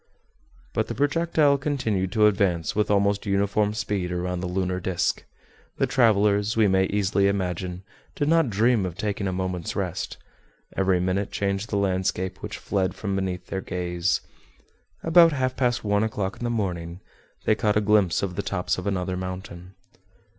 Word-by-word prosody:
But - - 0
the - - -4
projectile 145 -1 +2
continued 115 -10 -1
to 105 -1 +4
advance 95 -5 +1
with 105 0 +1
almost 100 0 +2
uniform 100 +1 +1
speed 105 -4 -2
around 90 0 -2
the 90 - -3
lunar 90 0 -1
disc. 90 -1 -1 0.5
The - - +2
travelers, 105 -2 +3
we 110 -2 +5
may 95 0 +3
easily 100 0 +1
imagine, 90 -2 -2 0.3
did 145 - 0
not 165 -4 +3
dream 110 +1 +2
of 90 -1 -4
taking 100 -1 -2
a - - -1
moment's 90 -2 -3
rest. 90 -4 -3 0.6
Every 95 -1 +2
minute 95 +2 0
changed 100 +2 -2
the 100 - 0
landscape 95 -1 -1
which - - -5
fled 95 -2 -1
from 100 -2 -3
beneath 95 -2 -2
their 95 - -4
gaze. 90 0 -1 0.8
About 165 0 +6
half 130 -2 -1
past 120 -2 0
one 105 -1 +2
o'clock 100 -3 -2
in - - -8
the - - 0
morning, 90 -6 -3 0.5
they - - +4
caught 105 -1 +1
a - - +5
glimpse 105 -4 +2
of 90 -3 -2
the 100 - -1
tops 95 -2 -1
of 90 - -5
another 95 -2 -1
mountain. 90 0 -7
100 Hz, 170 wpm, -25 LUFS, 90-105 Hz, 0.8 s, About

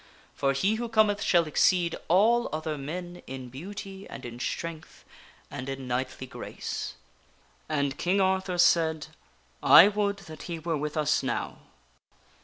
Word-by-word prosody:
For 135 0 +1
he 195 +11 +1
who 235 - -3
cometh 215 -2 +3
shall 170 -2 +3
exceed 170 +2 +2
all 225 +7 +4
other 155 0 -3
men 175 +5 -6
in 130 -1 -7
beauty 195 +7 -8
and 130 - -8
in 120 0 -8
strength 160 +6 -5 0.5
and 130 +2 -6
in 135 -1 -5
knightly 130 +1 -3
grace." 125 - -6 0.7
And 140 -3 -1
King 185 +3 +1
Arthur 190 -1 +1
said: 160 -3 +3 0.3
" - - -36 0.2
I 200 - +9
would 200 -1 0
that 155 -1 -10
he 170 - -3
were 165 0 -2
with 150 +1 -3
us 150 -1 +2
now." 130 -3 -3
160 Hz, 150 wpm, -28 LUFS, 140-190 Hz, 0.7 s, I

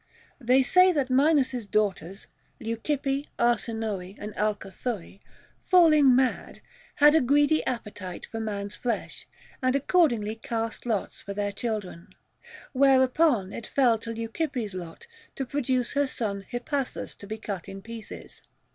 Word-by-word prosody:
They 255 +1 +4
say 365 +8 +5
that 275 -4 -1
Minos's 265 -4 +2
daughters 195 -3 -1 0.2
— - - -40
Leu 230 +1 -3
cippe, 280 -1 -1
Arsinoe, 220 -5 -1
and 210 0 -7
Alcathoe 210 -1 -3 0.2
— - - -33
falling 305 -7 +6
mad, 260 0 0 0.4
had 295 0 +6
a 320 - +5
greedy 290 +4 +3
appetite 210 -7 -5
for 225 - -6
man's 205 -2 -4
flesh, 235 -3 -4 0.3
and 255 0 +2
accordingly 270 - +2
cast 225 +1 -4
lots 215 -5 -2
for 200 - -7
their 205 0 -1
children. 200 -5 -5 0.6
Whereupon 260 - +3
it 230 - -7
fell 245 -5 +3
to 230 +1 -6
Leucippe's 230 - -3
lot 175 - -8 0.3
to 270 - -3
produce 255 -2 -1
her 285 -1 +2
son 200 -6 -4
Hippasus 260 +2 -3
to 200 - -10
be 220 +2 -5
cut 200 -4 -6
in 195 0 -9
pieces. 230 0 -10
235 Hz, 140 wpm, -27 LUFS, 210-270 Hz, 0.6 s, falling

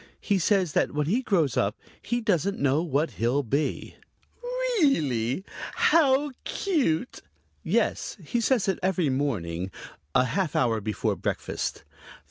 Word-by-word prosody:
He 200 -2 +1
says 185 -3 +2
that - - +1
when 150 0 +1
he 215 - +1
grows 170 - +1
up 100 +1 0 0.2
he 240 +2 -1
doesn't 200 -3 +1
know 140 +2 +2
what 155 -2 0
he'll 125 +5 +2
be." 140 +6 -2 0.8
"Really? 140 - +1 0.3
How 295 - +4
cute!" 255 - -1 0.4
"Yes, - - 0
he 240 - -1
says 235 -3 +2
it 190 - 0
every 185 -4 +1
morning, 95 -11 -2 0.5
a 125 - +5
half 185 +2 -1
hour 115 -3 +2
before 105 +1 -1
breakfast." - - -3
165 Hz, 130 wpm, -26 LUFS, 130-220 Hz, 0.8 s, a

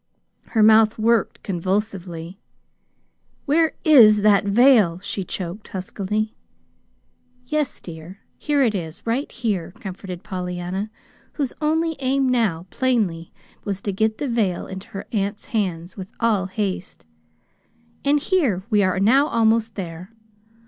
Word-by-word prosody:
Her 215 - +6
mouth 220 0 +6
worked 225 0 +1
convulsively. 185 -2 -3 1.1
"Where 320 +3 +2
is 220 -9 +7
that 205 -2 +4
veil?" 210 -5 +5
she 195 - -3
choked 185 +3 -6
huskily. 205 +3 -3 1.1
"Yes, 300 +1 -2
dear. 170 +2 -10 0.2
Here 290 -2 +2
it 230 -4 +2
is 165 -5 -6
right 240 +5 -1
here," 200 -8 -2
comforted 185 -2 -7
Pollyanna, 180 +1 -4 0.4
whose 280 -5 -2
only 320 +1 0
aim 270 0 +1
now, 220 -10 +1
plainly, 210 -11 0 0.3
was 200 -2 -3
to 200 - -1
get 220 +2 0
the 290 - -3
veil 220 -7 0
into 190 0 -8
her 195 - -7
aunt's 205 -1 -2
hands 180 -5 -2
with 190 -1 -6
all 210 -5 +1
haste. 190 - -4 1.0
"And 290 +1 +3
here 285 - +1
we 210 -1 +4
are 185 -1 +1
now 260 +9 +4
almost 225 -3 +2
there. 175 -1 -6
210 Hz, 130 wpm, -22 LUFS, 185-235 Hz, 1.1 s, is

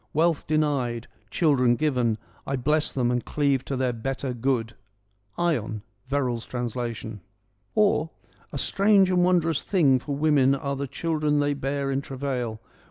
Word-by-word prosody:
Wealth 165 0 +1
denied, 140 -6 0 0.2
Children 125 - +3
given, 125 -6 +1 0.3
I 135 - 0
bless 150 +4 +1
them 125 -2 0
and 125 -1 0
cleave 140 -3 +1
to 135 - -3
the 130 -1 0
better 135 +3 -3
good.' 120 -2 -1 0.4
— 100 0 -41
(Ion. 115 -11 -1 0.2
Verr 140 -1 0
all's 120 -2 -4
translation.) 120 -3 -4 0.5
or 200 -7 +3 0.2
— - - -32
A - - -4
strange 195 +4 +3
and 180 -1 +3
wondrous 170 -4 +2
thing 145 -10 +3
for 140 +3 -4
women 140 -2 +3
are 140 0 -3
the 140 +1 -3
children 150 0 0
they 145 0 +1
bear 140 0 -2
in 135 0 0
travail. 130 -5 -3
135 Hz, 160 wpm, -25 LUFS, 125-150 Hz, 0.5 s, Children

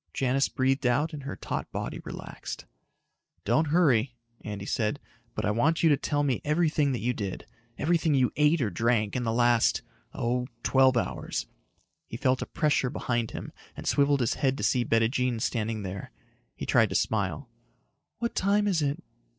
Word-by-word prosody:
Janis 135 +1 +1
breathed 135 0 +1
out 145 +7 +1
and 150 - -6
her 140 - -4
taut - - -4
body - - -4
relaxed. - - -8 0.8
"Don't 160 0 +2
hurry," 140 -7 +3 0.3
Andy 105 -2 -5
said, 110 +6 -1 0.4
"but - - -2
I 105 - +2
want 145 +11 +1
you 165 - +6
to 145 - +5
tell 145 +1 -1
me 135 -5 0
everything 150 -2 +2
that 120 - -3
you 125 +2 0
did 100 -5 -5 0.3
everything 160 -1 +2
you 130 -2 +3
ate 150 +1 +3
or 110 -5 0
drank 110 +2 +1
in 125 - 0
the 115 - +1
last... 120 0 +3 0.3
oh, 125 +1 -1 0.2
twelve 130 -1 +4
hours." 90 - -2 0.6
He 115 - -6
felt 130 0 +1
a - - -3
pressure 145 -4 +1
behind 120 -2 -1
him - - -7 0.3
and - - -7
swiveled 140 -1 +3
his 115 - +1
head 135 -1 0
to - - -4
see 125 -2 +2
Bettijean 115 +1 +1
standing 110 -2 -2
there. 95 0 -6 0.4
He - - -5
tried - - +4
to - - -4
smile. 110 +5 0 0.7
"What 235 0 -2
time 205 +2 +2
is 180 -5 +1
it?" 145 +4 -1
130 Hz, 175 wpm, -28 LUFS, 115-145 Hz, 0.8 s, you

